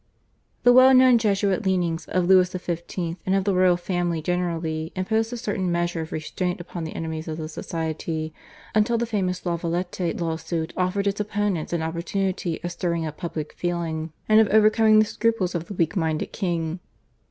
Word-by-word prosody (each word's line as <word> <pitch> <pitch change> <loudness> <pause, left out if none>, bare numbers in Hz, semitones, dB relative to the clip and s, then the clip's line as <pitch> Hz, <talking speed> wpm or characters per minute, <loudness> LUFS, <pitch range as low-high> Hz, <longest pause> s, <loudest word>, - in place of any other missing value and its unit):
The 245 0 +7
well 260 +1 +8
known 255 -2 +6
Jesuit 200 -3 +1
leanings 175 -4 0
of 185 -1 0
Louis 185 0 +5
XV. 170 -1 -4
and 190 - +1
of 195 - +2
the 200 0 +1
royal 180 -1 +4
family 175 -2 -1
generally, 165 -2 -2
imposed 220 +4 0
a 245 - -4
certain 205 -6 -2
measure 175 -1 -1
of 160 - -7
restraint 180 +3 -3
upon 175 -1 -6
the 160 - -7
enemies 160 0 -4
of 155 -1 -4
the 155 -1 -4
Society, 160 0 -4 0.4
until 220 +2 +3
the 235 - 0
famous 190 -5 -2
La 170 -1 0
Valette 170 +1 -2
law 165 -2 -1
suit 160 0 -4
offered 185 +2 0
its 200 0 0
opponents 205 -5 -1
an 170 -2 -1
opportunity 170 +1 -2
of 175 - -3
stirring 170 -1 -2
up 155 -1 -5
public 155 -3 -5
feeling 165 -2 -3 0.2
and 215 0 +6
of 220 - +5
overcoming 215 +1 +5
the 215 - +6
scruples 215 -4 0
of 170 -1 -3
the 200 - -7
weak 165 +2 0
minded 160 -4 -1
king. 170 -3 -2
175 Hz, 185 wpm, -24 LUFS, 165-200 Hz, 0.4 s, well